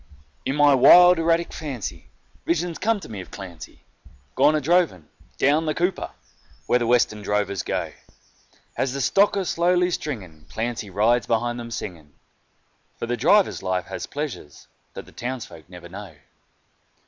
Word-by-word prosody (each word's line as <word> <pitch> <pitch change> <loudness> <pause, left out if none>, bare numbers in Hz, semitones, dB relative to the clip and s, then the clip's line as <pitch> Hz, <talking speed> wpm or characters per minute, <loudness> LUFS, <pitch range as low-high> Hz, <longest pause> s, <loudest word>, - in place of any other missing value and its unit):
In 135 - -1
my 145 -1 +5
wild 175 +7 +7
erratic 165 +1 +1
fancy 135 -8 -6 0.4
visions 170 0 -1
come 225 +1 +1
to - - -9
me 105 -4 -7
of - - -12
Clancy 85 -5 -10 0.5
Gone 150 - +4
a - - +2
droving 150 - +1 0.3
"down 150 +4 +2
the 155 - 0
Cooper" 180 +2 -1 0.6
where 125 - +2
the 120 - -1
Western 115 -3 +2
drovers 100 -2 -1
go; - - -3 0.8
As 130 -1 -1
the 140 - -4
stock 200 +8 +3
are 195 - -1
slowly 180 +1 +2
stringing, 95 - -6
Clancy 115 -2 -4
rides 110 +5 +2
behind 120 +1 0
them 115 0 -7
singing, 85 -10 -7 0.8
For - - -4
the 120 +1 -1
drover's 195 - +3
life 95 -1 -2
has - - -6
pleasures 145 - -7 0.3
that - - -7
the - - -17
townsfolk 115 -10 -7
never 90 -1 -11
know. 95 -2 -10
120 Hz, 155 wpm, -23 LUFS, 100-165 Hz, 0.8 s, wild